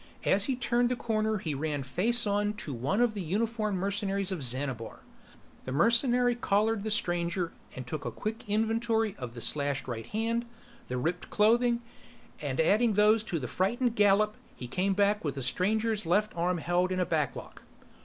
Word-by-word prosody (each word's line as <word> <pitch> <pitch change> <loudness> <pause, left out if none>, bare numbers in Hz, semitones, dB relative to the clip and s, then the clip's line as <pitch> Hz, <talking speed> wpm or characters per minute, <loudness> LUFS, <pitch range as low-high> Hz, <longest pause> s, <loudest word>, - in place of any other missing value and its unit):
As 200 +1 +3
he 265 - 0
turned 240 0 +1
the 250 - 0
corner 220 -2 0
he 160 -6 -3
ran 145 0 -2
face 220 - +1
on 205 0 +1
to 160 -9 -6
one 135 - 0
of 240 -2 +3
the 205 - -4
uniformed 215 +3 -1
mercenaries 195 0 -1
of 180 -5 -3
Xanabar. 130 -2 -2 0.6
The 130 - -4
mercenary 240 - +3
collared 220 -2 +1
the 220 - -3
stranger 175 -3 0 0.2
and 130 - -6
took 145 +4 -5
a - - -2
quick 220 0 -5
inventory 225 0 +1
of 125 -2 -7
the 120 - -7
slashed 140 0 -1
right 115 -2 -5
hand, 230 +2 -1 0.4
the 125 - -3
ripped 165 +7 -2
clothing, 235 +3 +3 0.6
and 140 -3 -3
adding 215 +7 +3
those 210 +2 +4
to 175 - -2
the 130 - -4
frightened 235 +5 0
gallop 210 0 +3 0.2
he 125 - -7
came 190 +8 0
back 205 +1 +2
with 145 -4 -2
the 135 - -4
stranger's 210 - 0
left 210 +5 +1
arm 175 +1 0
held 175 +2 0
in 185 - -1
a 180 - +2
backlock. 155 -6 -3
200 Hz, 180 wpm, -29 LUFS, 160-220 Hz, 0.6 s, those